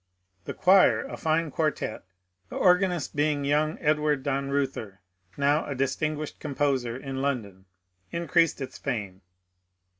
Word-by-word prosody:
The - - -5
choir, 190 +1 +5
a - - -6
fine 160 -1 0
quartette, 155 -8 -2 0.5
the - - -8
organist 180 -4 +2
being 145 -1 +1
young 150 +2 +1
Edward 150 -2 +1
Dannreuther, 135 -7 -2 0.4
now 145 +2 +2
a 140 - -3
dis 135 +1 0
tinguished 155 -1 -3
composer 135 -5 -1
in 135 0 -5
London, 105 -9 -3 0.5
increased 170 -2 +1
its 135 - -6
fame. 105 -8 -4
145 Hz, 125 wpm, -27 LUFS, 135-155 Hz, 0.5 s, choir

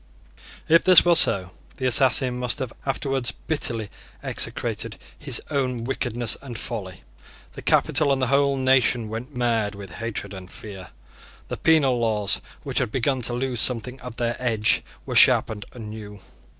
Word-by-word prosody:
If 165 +1 +4
this 185 -2 +7
were 175 - +5
so, 95 - +6 0.3
the 130 - -4
assassin 130 0 +3
must 125 -1 -2
have 130 -3 -5
afterwards 135 -3 -1
bitterly 115 -9 -2 0.3
execrated - - -2 0.2
his - - +2
own 125 -4 -2
wickedness 120 -3 0
and 125 -5 -8
folly. 95 -7 -7 0.5
The - - -9
capital 145 -2 +2
and 135 - +1
the 130 - +1
whole 140 0 +2
nation 130 -3 +1
went 120 +5 -7
mad 115 -4 -1
with 100 -3 -10
hatred 105 -1 -6
and 95 -1 -10
fear. 95 -2 -10 0.6
The - - -4
penal 140 -6 +2
laws, 105 -3 0 0.2
which - - -2
had - - -2
begun 130 +1 -1
to 120 - 0
lose 125 -1 -2
something 125 +2 0
of 125 -2 -9
their 120 0 -1
edge, 110 -4 +2 0.2
were - - -5
sharpened 105 -2 +4
anew. 105 -3 -9
120 Hz, 155 wpm, -23 LUFS, 110-130 Hz, 0.6 s, this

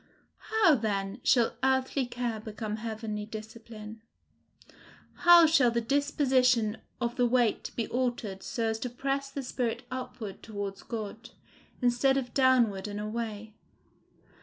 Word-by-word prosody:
How, 435 -7 +5
then, 205 -3 -1
shall 235 -2 +3
earthly 265 0 +1
care 240 -2 -3
become 215 0 -5
heavenly 220 -1 -5
discipline? 220 0 -9 1.3
How 345 -1 +10
shall 305 -6 +5
the 235 0 0
disposition 255 -4 +2 0.2
of 240 +1 -2
the 245 -1 +3
weight 240 -2 +1
be 230 - -2
altered 240 -6 -2
so 230 -4 -2
as 220 - -4
to 250 - -3
press 275 +3 -2
the 275 0 -5
spirit 245 -1 -2
upward 245 -5 -6
towards 200 -2 -5
God, 225 0 -6 0.5
instead 250 +3 +3
of 245 -2 -3
downward 240 -7 +3
and 205 0 -5
away? 215 0 -5
235 Hz, 130 wpm, -29 LUFS, 215-260 Hz, 1.3 s, How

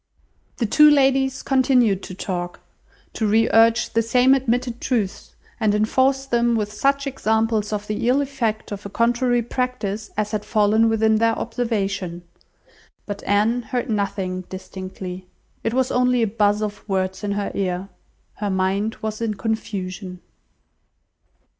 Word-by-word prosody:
The 235 - 0
two 300 +8 +6
ladies 270 -2 +2
continued 250 -7 +3
to 185 - -8
talk, 175 -2 -4 0.5
to 220 - -1
re 220 +2 +3
urge 230 +1 +4
the 230 - +3
same 250 +3 +4
admitted 245 -2 0
truths, 215 -7 -2 0.2
and 215 -2 +2
enforce 260 +5 +2
them 235 -2 +1
with 210 -1 -2
such 275 +5 +1
examples 220 -5 0
of 210 -1 -3
the 210 +2 -2
ill 260 +3 +4
effect 255 -8 -2
of 205 0 -6
a 200 - -6
contrary 240 +3 +1
practice 230 -4 -3
as 210 0 -1
had 210 -1 -2
fallen 220 +1 +3
within 220 0 +3
their 225 0 +2
observation, 200 -7 -2 0.8
but 205 -1 -6
Anne 215 +4 +2
heard 245 0 -3
nothing 195 -3 -2
distinctly; 185 -1 -7 0.4
it 225 - 0
was 260 -1 +1
only 250 -1 +2
a - - +4
buzz 210 0 +1
of 205 -1 -5
words 190 +1 -1
in 200 -1 -1
her 205 0 -2
ear, 185 -1 -2 0.5
her 205 -1 -2
mind 195 +3 0
was 215 0 -3
in 220 -2 -1
confusion. 190 -3 -4
220 Hz, 145 wpm, -22 LUFS, 200-245 Hz, 0.8 s, two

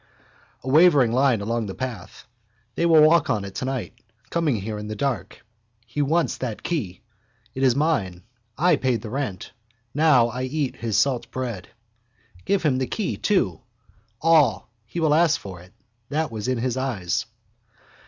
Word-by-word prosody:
A - - -9
wavering 145 -4 +5
line 125 -3 +2
along 115 +1 -2
the 95 - -6
path. 130 -4 -7 0.5
They 170 - +1
will 160 -2 +7
walk 155 -1 +4
on 105 -5 0
it 100 - -8
tonight, 130 -1 -4 0.3
coming 165 -6 +1
here 105 +1 -4
in 105 - -6
the 110 - -5
dark. 120 0 -3 0.4
He 120 +6 -3
wants 160 +4 +1
that 120 -5 -5
key. 110 - -3 0.5
It 130 - -5
is 130 -3 +4
mine. 115 - 0 0.3
I 170 +1 +3
paid 125 -5 0
the 110 - -7
rent. 125 -9 -4 0.4
Now 140 -6 +4
I 125 +2 -5
eat 140 0 -2
his 110 -3 -1
salt 130 -4 +1
bread. 120 -8 -5 0.8
Give 200 -2 +1
him 135 -5 +2
the 130 - -1
key 210 -5 -2
too. 100 - 0 0.6
All. 155 -9 +3 0.2
He 170 - -5
will 155 -2 +3
ask 165 0 +3
for 95 -3 -9
it. 90 +2 -17 0.4
That 155 +1 -1
was 110 -1 -5
in 130 -1 0
his 125 +1 -2
eyes. 115 -10 -2
130 Hz, 165 wpm, -23 LUFS, 110-150 Hz, 0.8 s, will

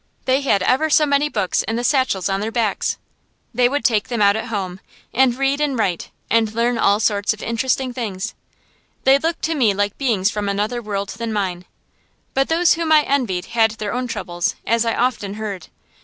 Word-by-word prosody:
They 260 +2 +2
had 205 -9 +2
ever 270 +10 +2
so 300 0 +4
many 285 +1 +2
books 205 -8 0
in 225 - -3
the 240 - -2
satchels 255 -9 +1
on 195 0 -1
their 215 +2 -3
backs. 225 -3 0 0.6
They 245 +1 +3
would 285 +2 -2
take 215 -4 +2
them 240 -2 -3
out 200 -1 +4
at 220 - -3
home, 195 -5 -4 0.3
and 255 -1 +3
read 275 +2 0
and 285 -4 0
write, 185 -6 -1 0.2
and 225 -1 +2
learn 235 0 +1
all 200 -1 +3
sorts 205 -1 +1
of 215 - -11
interesting 250 +2 -1
things. 210 -7 -4 0.7
They 270 +1 +5
looked 330 +3 -2
to 325 - +1
me 235 -10 +2
like 205 0 -1
beings 225 -7 +1
from 205 -1 -2
another 210 +5 -1
world 200 -2 -3
than 230 -1 -4
mine. 185 -4 -2 0.7
But 270 0 +1
those 335 +2 +4
whom 330 -1 -2
I 305 -1 +6
envied 240 -12 -1
had 225 -1 +4
their 210 -1 -3
own 250 +1 -2
troubles, 175 -6 -2
as 230 0 +2
I 230 - 0
often 220 -5 -1
heard. 205 -5 -5
230 Hz, 200 wpm, -20 LUFS, 205-265 Hz, 0.7 s, I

